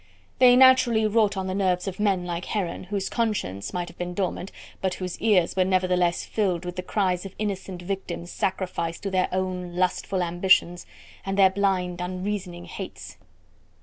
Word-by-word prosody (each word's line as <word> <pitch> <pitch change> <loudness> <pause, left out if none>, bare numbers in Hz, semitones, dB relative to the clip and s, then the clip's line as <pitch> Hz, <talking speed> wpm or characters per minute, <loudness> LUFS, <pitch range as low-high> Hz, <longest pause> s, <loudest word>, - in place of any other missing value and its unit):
They 250 -1 +8
naturally 255 -4 +6
wrought 210 -2 +2
on 190 - -2
the 185 - -2
nerves 185 -1 0
of 190 0 -5
men 195 -4 +1
like 175 0 -4
Heron, 185 -4 -3
whose 195 0 -2
conscience 210 - -2
might 175 -1 -3
have 175 - -14
been 175 0 -4
dormant, 190 -1 -2 0.3
but 190 -1 0
whose 180 -2 -5
ears 195 -6 +3
were 190 - +4
nevertheless 180 -2 +1
filled 185 -5 -1
with 180 0 -5
the 180 - -3
cries 185 -1 0
of 195 -1 -9
innocent 190 -3 -4
victims 180 -2 -5
sacrificed 180 -3 -2
to 195 - -2
their 185 -1 +1
own 180 -1 -3
lustful 185 +1 0
ambitions 175 0 +2 0.4
and 195 0 -3
their 190 -1 +6
blind, 185 -3 0
unreasoning 185 -1 -4
hates. 190 +1 -8
185 Hz, 170 wpm, -25 LUFS, 180-200 Hz, 0.4 s, They